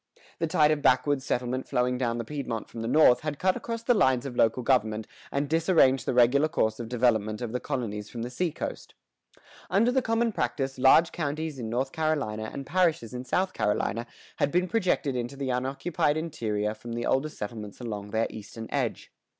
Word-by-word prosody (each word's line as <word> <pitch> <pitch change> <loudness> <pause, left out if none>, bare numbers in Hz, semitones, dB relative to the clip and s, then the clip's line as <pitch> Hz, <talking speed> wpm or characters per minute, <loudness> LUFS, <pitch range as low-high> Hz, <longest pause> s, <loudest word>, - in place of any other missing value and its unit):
The 165 - 0
tide 155 -1 +4
of 150 -1 0
backwoods 130 +1 +3
settlement 125 +1 -1
flowing 125 0 0
down 120 -2 0
the 115 - -4
Piedmont 125 -5 -4
from 115 - -7
the 115 - -3
north, 130 -1 +6
had 150 -2 -4
cut 185 +2 +2
across 230 0 -5
the 245 - +4
lines 130 - +2
of 130 -3 -5
local 115 +2 +2
government 110 -4 +1 0.3
and 140 +1 -1
disarranged 160 -4 +3
the - - +1
regular 125 +5 +5
course 110 -8 0
of 115 -1 -5
development 110 -4 +1
of 120 -3 -4
the 125 - -2
colonies 110 -8 -4
from 115 -1 -5
the 120 - -5
seacoast.[116:1] 170 +4 -6 0.3
Under 230 +5 +3
the 260 +1 +2
common 230 0 +1
practice, 135 -9 -2
large 135 +6 +6
counties 155 -2 -3
in 115 -2 -4
North 130 +4 -1
Carolina 140 -9 -1
and 140 - -6
parishes 165 -8 +1
in 125 +1 -5
South 185 +7 0
Carolina 105 +2 -1 0.3
had 145 - +1
been 180 +1 +2
projected 180 - 0
into 125 +2 -3
the 135 -1 -2
unoccupied 135 +4 0
interior 110 -10 -2
from 115 +2 -8
the 120 0 -3
older 135 +4 +1
settlements 105 -5 -7
along 105 -4 -5
their 110 +2 +1
eastern 110 +1 -8
edge. - - -2
130 Hz, 190 wpm, -27 LUFS, 115-155 Hz, 0.3 s, north